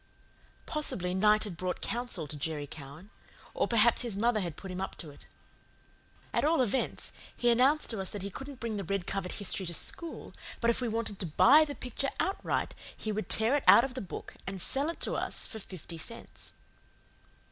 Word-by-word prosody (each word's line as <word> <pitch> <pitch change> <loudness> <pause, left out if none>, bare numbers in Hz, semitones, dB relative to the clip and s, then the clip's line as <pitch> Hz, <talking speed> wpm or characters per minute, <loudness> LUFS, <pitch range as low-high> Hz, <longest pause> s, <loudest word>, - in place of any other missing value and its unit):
Possibly 190 - -1
night 210 +3 +4
had 205 -5 -5
brought 180 +1 -2
counsel 235 -9 -2
to 150 - -5
Jerry 150 0 -2
Cowan; 155 +7 -11 0.4
or - - +1
perhaps 230 0 +4
his 235 -5 -2
mother 230 +1 +2
had 170 -5 -3
put 190 - -8
him 185 +1 -4
up 190 - -4
to 155 -5 -8
it. 140 - -16 1.1
At - - +2
all 315 +2 +3
events, 250 +3 -1 0.3
he 240 -1 +4
announced 265 +6 +3
to 220 -4 -2
us 190 - -1
that 205 -2 -6
he 200 - -4
couldn't 270 +4 -8
bring 225 -2 -3
the 200 - -3
red 195 +1 -2
covered 195 -1 -3
history 195 -2 +1
to 170 - -1
school, 335 - -1 0.3
but 235 0 +3
if 235 - -3
we 245 - 0
wanted 225 -3 -2
to 180 - -2
buy 285 - +7
the 290 -1 -6
picture 255 +3 -2
outright 390 - -1 0.2
he 215 - -3
would 215 +1 -3
tear 225 +5 +3
it 290 - 0
out 235 - +9
of 265 -1 -3
the 255 - -4
book 185 - -7
and 195 -1 -4
sell 275 - +2
it 335 - -5
to - - -1
us - - -1
for 220 - -7
fifty 175 -4 -9
cents. 230 - -8
215 Hz, 205 wpm, -31 LUFS, 185-245 Hz, 1.1 s, out